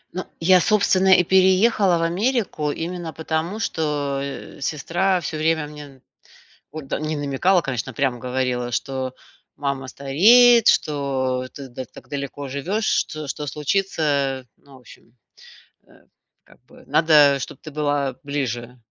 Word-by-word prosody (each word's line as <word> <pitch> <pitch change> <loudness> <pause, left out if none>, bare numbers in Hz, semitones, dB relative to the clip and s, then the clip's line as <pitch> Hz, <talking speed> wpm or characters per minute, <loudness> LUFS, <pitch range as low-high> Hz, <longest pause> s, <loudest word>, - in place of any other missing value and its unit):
Ну, 185 - -3 0.2
я, 180 +1 +5
собственно, 190 -3 +3
и 180 - +4
переехала 190 +1 +3
в 165 - -1
Америку 185 - -1
именно, 170 +1 -5
потому 160 +6 -3
что, 145 -7 -2
э, 140 0 -7
сестра 175 +6 0
всё 160 -2 -4
время 160 0 +1
мне 145 -3 -12 0.7
вот, 155 -3 -8
да, - - -3
не 155 0 -2
намекала, 145 +6 +1
конечно, 130 -2 -4
а - - -22
прямо 130 -3 0
говорила, 125 -1 -2
что 130 +1 -3 0.4
мама 140 -2 -3
стареет, 225 - +5
что 135 -3 +1
да 140 - -8
ты 135 - -9
да 130 +1 -7
так - - -16
далеко 140 0 -5
живешь, 185 +11 -2
что 155 -2 -6
что 150 +1 -4
случится, 145 -4 -1
ну, 140 - -22
в - - -14
общем, 125 - -17 0.8
э, - - -22 0.5
как - - -22
бы. - - -18
Надо, 150 -4 +5
чтоб - - -7
ты 155 - -10
была 145 -3 -1
ближе, 125 -4 -4
150 Hz, 150 wpm, -22 LUFS, 135-175 Hz, 0.8 s, я